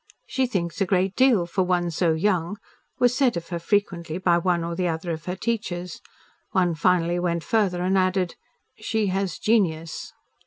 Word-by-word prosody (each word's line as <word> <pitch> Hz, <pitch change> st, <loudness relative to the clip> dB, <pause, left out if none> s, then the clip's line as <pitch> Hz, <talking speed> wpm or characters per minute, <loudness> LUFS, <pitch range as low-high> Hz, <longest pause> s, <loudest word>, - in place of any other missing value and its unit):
"She 265 Hz, -2 st, 0 dB
thinks 170 Hz, -5 st, -3 dB
a 195 Hz, -, +2 dB
great 190 Hz, +1 st, +1 dB
deal 250 Hz, -9 st, +4 dB
for 180 Hz, +3 st, -1 dB
one 180 Hz, -1 st, +1 dB
so 165 Hz, 0 st, +2 dB
young," 180 Hz, +2 st, 0 dB, 0.4 s
was 245 Hz, 0 st, +3 dB
said 255 Hz, -8 st, +2 dB
of 170 Hz, -, -6 dB
her 170 Hz, -2 st, -3 dB
frequently 170 Hz, -3 st, -1 dB
by 175 Hz, -2 st, +3 dB
one 175 Hz, -1 st, +1 dB
or 170 Hz, 0 st, -3 dB
the 180 Hz, 0 st, 0 dB
other 165 Hz, +1 st, -2 dB
of 160 Hz, -1 st, -5 dB
her 180 Hz, -, -3 dB
teachers. 190 Hz, -5 st, -3 dB, 0.5 s
One 180 Hz, -4 st, +2 dB
finally 175 Hz, +1 st, +2 dB
went 170 Hz, -2 st, -1 dB
further 190 Hz, -4 st, +1 dB
and 190 Hz, +1 st, +1 dB
added, 185 Hz, -1 st, +1 dB, 0.5 s
"She 220 Hz, -3 st, 0 dB
has 195 Hz, -1 st, -1 dB
genius." 170 Hz, -8 st, 0 dB
180 Hz, 180 wpm, -24 LUFS, 170-200 Hz, 0.5 s, deal